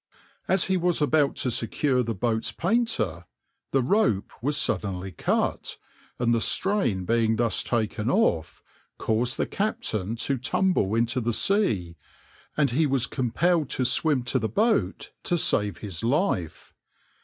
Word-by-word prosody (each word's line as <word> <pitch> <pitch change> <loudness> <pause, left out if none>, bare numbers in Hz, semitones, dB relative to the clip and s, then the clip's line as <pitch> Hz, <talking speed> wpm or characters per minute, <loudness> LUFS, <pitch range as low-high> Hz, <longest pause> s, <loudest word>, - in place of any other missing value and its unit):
As 190 -1 +3
he 190 -1 +1
was 175 -1 +1
about 150 -1 +2
to 125 - -1
secure 125 +4 +1
the 115 -2 -3
boat's 110 +2 -1
painter 165 - -1 0.4
the 135 -2 +1
rope 165 - +1
was 145 +3 +1
suddenly 95 -2 -1
cut, 85 - -1 0.4
and 120 -1 +1
the 115 - +1
strain 190 - +1
being 115 0 +2
thus 115 0 +1
taken 110 -1 -1
off, 110 - 0 0.3
caused 120 +3 +1
the - - 0
captain 195 - -2
to 130 +3 -2
tumble 130 - +1
into 120 +3 +1
the 120 0 -1
sea, 105 - +1 0.6
and 145 -4 +2
he 155 +5 +2
was 135 -3 +2
compelled 150 +6 0
to 130 - -1
swim 130 +1 +2
to 125 +2 0
the 110 -2 -2
boat 220 - 0
to 175 - 0
save 105 - +1
his 95 -4 -7
life. 120 - -1
125 Hz, 145 wpm, -25 LUFS, 110-160 Hz, 0.6 s, As